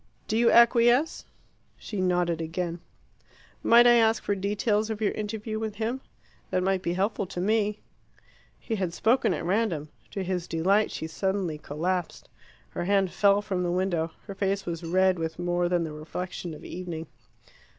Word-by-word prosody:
Do 215 - -1
you 235 +1 +4
acquiesce?" 240 +5 +4 0.5
She 205 -3 -5
nodded 175 -2 +1
again. 170 +1 -3 0.8
"Might 235 +1 +6
I 240 0 +7
ask 225 -1 +3
for 205 - 0
details 205 +2 0
of 220 -1 -3
your 215 -2 +1
interview 215 +1 -4
with 220 -2 -4
him? 230 +5 -2 0.5
They - - +1
might 190 0 +1
be 170 - -1
helpful 195 +1 -1
to 180 - -6
me." 210 +2 +1 0.8
He 225 - -4
had 180 -3 -2
spoken 250 +4 +2
at - - -2
random. 180 -6 0 0.2
To 195 - -4
his 180 -2 -2
delight 195 +6 +2
she - - -5
suddenly 180 -1 -2
collapsed. 175 +5 -3 0.4
Her - - -4
hand 195 -1 +2
fell 200 0 +3
from 190 -3 -2
the 175 - 0
window. 175 -2 0 0.2
Her 200 - -6
face 195 0 -1
was 170 -1 -4
red 185 +1 +2
with 160 0 -3
more 175 0 0
than 175 -1 +1
the 160 -2 -5
reflection 165 +2 -6
of - - -12
evening. 175 -3 -6
190 Hz, 170 wpm, -27 LUFS, 175-215 Hz, 0.8 s, I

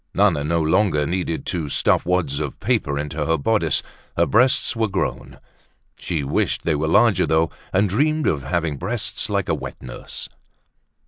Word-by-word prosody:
Nana 95 -8 +3
no 85 +3 0
longer 80 -2 +2
needed 85 0 -2
to 80 -5 -2
stuff - - +2
wads 85 -6 0
of 75 -3 -4
paper 95 - 0
into 75 +1 -3
her 80 0 +2
bodice, 85 -1 +1 0.3
her - - +4
breasts 125 +2 +2
were 115 -1 +1
grown. 95 -1 -3 0.6
She 80 -5 -2
wished 70 - 0
they 85 - +1
were 75 +1 -1
larger 105 +2 +4
though, 80 +1 +2 0.2
and 100 +3 +3
dreamed 150 +10 +1
of 70 - +1
having 80 +1 -1
breasts 105 - -3
like - - 0
a - - +1
wet - - -6
nurse. - - -8
85 Hz, 170 wpm, -22 LUFS, 75-105 Hz, 0.6 s, her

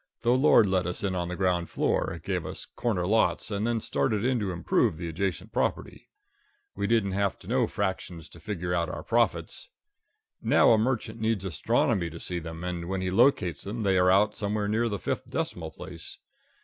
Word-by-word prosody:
The 120 - +3
Lord 130 -4 +6
let 95 -2 +1
us 90 - -4
in 95 -2 0
on 90 -1 -2
the 90 - -4
ground 90 -3 0
floor, - - 0
gave - - -2
us - - -5
corner 100 -7 -2
lots, 110 +2 +1
and 105 +2 -1
then 120 -1 +1
started 110 0 0
in 130 -1 +2
to 100 -3 -2
improve 85 -2 +1
the 85 +1 -5
adjacent 85 -1 -3
property. - - -2 0.6
We 100 0 -2
didn't 110 -3 +2
have 100 0 0
to - - -16
know 120 +1 +2
fractions 95 -6 -3
to 85 - -14
figure 90 0 -3
out 85 -2 0
our - - -6
profits. - - 0 0.7
Now - - +5
a 115 - +6
merchant 115 0 -1
needs 110 -3 0
astronomy 85 +2 +1
to 80 +1 -9
see 90 +1 -4
them, 80 0 -7
and 90 -1 -4
when 95 -1 -1
he 95 0 -1
locates 95 - +3
them 110 +3 -4
they 95 -2 +2
are 90 0 +4
out 105 +3 +4
somewhere 105 0 -1
near 115 +3 +1
the 100 - -2
fifth - - -3
decimal - - -3
place. - - -8
95 Hz, 200 wpm, -27 LUFS, 90-110 Hz, 0.7 s, Lord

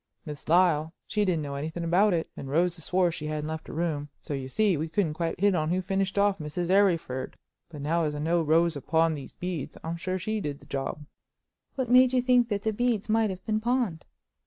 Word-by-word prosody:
Miss 150 -1 -8
Lyle, 165 -2 +3
she 210 -1 0
didn't 170 -5 0
know 140 -1 -5
anything 160 +4 -4
about 185 +5 +3
it, 165 - -1
and 135 - -7
Rosa 170 +3 +1
swore 180 +2 +2
she 150 -1 -5
hadn't 150 0 -3
left 160 0 -5
her - - -8
room, 155 -3 -2
so, - - -6
you 135 -1 -4
see, 210 +4 +2
we 160 +2 -3
couldn't 165 -2 0
quite 165 +1 -3
hit 200 +1 +4
on 155 -3 0
who 180 +2 +1
finished 195 +1 -1
off 200 -1 +3
Mrs. 165 +4 -3
Arryford. 170 -10 +1 0.3
But 150 -4 -8
now 165 +2 +1
as 150 -1 -2
I - - -4
know 165 +3 +1
Rosa 160 -1 +2
pawned 160 +3 +2
these 140 - -9
beads, 175 -6 -5
I'm 165 +1 -3
sure 185 +2 -2
she 215 +4 -2
did 145 -3 -4
the - - -17
job." 140 +2 -4 0.7
"What 255 -3 -2
made 255 0 +6
you 255 - +4
think 250 -2 +4
that 200 -2 -2
the 220 - 0
beads 230 -2 0
might 220 0 +3
have 185 -1 -7
been 215 -1 0
pawned?" 235 -7 -1
170 Hz, 230 wpm, -27 LUFS, 155-200 Hz, 0.7 s, made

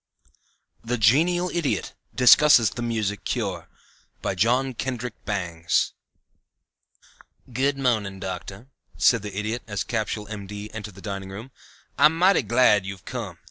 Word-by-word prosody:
THE 120 +2 -2
GENIAL 165 - +3
IDIOT 170 -5 -2 0.2
DISCUSSES 125 -1 +6
THE 120 - -6
MUSIC 110 -3 -2
CURE 95 -9 -3 0.6
BY - - -1
JOHN 125 +8 +1
KENDRICK 125 -1 -4
BANGS 85 -5 -1 1.6
"Good 135 +3 +1
morning, 110 -7 0
Doctor," 95 +3 -6 0.3
said 115 -3 +4
the 105 -2 -7
Idiot 110 +3 -2
as 100 -2 -2
Capsule, 110 -2 -3
M.D., 105 0 -7
entered 105 -3 -7
the 95 - -12
dining 95 -1 -5
room. 110 +7 -9 0.5
"I - - +7
am 160 +2 +4
mighty 190 +3 +4
glad 115 -4 +3
you've 95 -1 -8
come. - - -6
110 Hz, 135 wpm, -24 LUFS, 100-125 Hz, 1.6 s, I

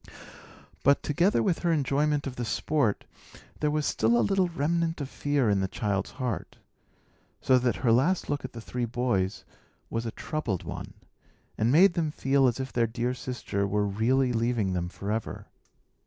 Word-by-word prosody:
But, 140 +1 +4
together 170 +7 +2
with 185 -5 +1
her 175 - +1
enjoyment 145 0 +1
of 135 -2 -5
the 120 - -3
sport, 120 -1 0 0.5
there 150 - +1
was 150 0 0
still 115 +2 +2
a 120 - +3
little 195 -2 +2
remnant 165 +1 -1
of 140 - -3
fear 145 -4 0
in 100 -2 +3
the 95 - 0
child's 100 0 -2
heart; 125 -7 -4 0.8
so 130 -1 +4
that 125 -1 +1
her 115 - +5
last 150 +11 +2
look 145 -1 -2
at 130 - -7
the 115 - -7
three 120 +2 -3
boys 115 -5 -1 0.5
was 115 0 -2
a - - -3
troubled 125 - -3
one, - - -7 0.6
and 110 +3 +1
made 175 +5 +6
them 165 -3 0
feel 135 -2 +2
as 120 +1 0
if 130 -1 -5
their 115 -1 +2
dear 120 +2 -2
sister 120 -6 -3
were 105 +1 +1
really 120 +6 +1
leaving 115 -4 0
them 90 -1 -2
forever. 105 +4 -4
125 Hz, 175 wpm, -28 LUFS, 110-150 Hz, 0.8 s, made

